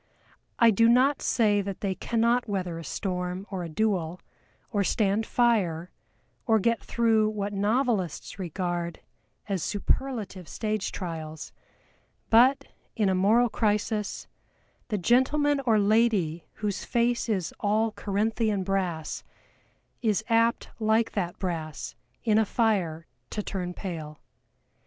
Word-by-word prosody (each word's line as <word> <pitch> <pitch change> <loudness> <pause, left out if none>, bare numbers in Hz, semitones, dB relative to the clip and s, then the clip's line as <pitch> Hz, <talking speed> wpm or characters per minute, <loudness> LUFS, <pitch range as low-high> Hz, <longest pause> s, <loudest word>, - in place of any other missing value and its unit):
I 230 -1 +6
do 230 +3 +4
not 260 +4 +4
say 210 -4 +2
that 195 -1 -6
they 195 -2 0
cannot 235 +3 +1
weather 180 -4 -2
a - - -7
storm 180 +1 -3
or 190 -2 -3
a 170 - -5
duel, 180 -2 -1 0.5
or 205 -3 +1
stand 210 +2 +1
fire, 185 -9 +1 0.6
or 220 - +5
get 230 +1 +1
through 225 -2 +2
what 205 -1 -3
novelists 205 - 0
regard 175 -1 -3 0.5
as 195 -4 -1
superlative 205 - -2
stage 215 -2 -2
trials; 160 -4 -6 0.8
but, 250 +5 +6 0.3
in 210 -3 +2
a - - +2
moral 215 +6 +4
crisis, 210 -1 -1 0.6
the 215 - -1
gentleman 275 - +3
or 220 -2 +5
lady 205 -6 +2
whose 210 -3 -3
face 240 0 0
is 190 -6 -1
all 215 +2 +1
Corinthian 210 0 0
brass 180 -5 -2 0.8
is 215 -3 +1
apt 230 0 +2
like 220 +1 +2
that 175 -4 -3
brass 160 -5 -4 0.3
in 220 -2 +3
a 220 - +3
fire 190 -8 0 0.2
to 210 - -3
turn 180 -3 -4
pale. 155 -5 -6
205 Hz, 125 wpm, -27 LUFS, 180-225 Hz, 0.8 s, I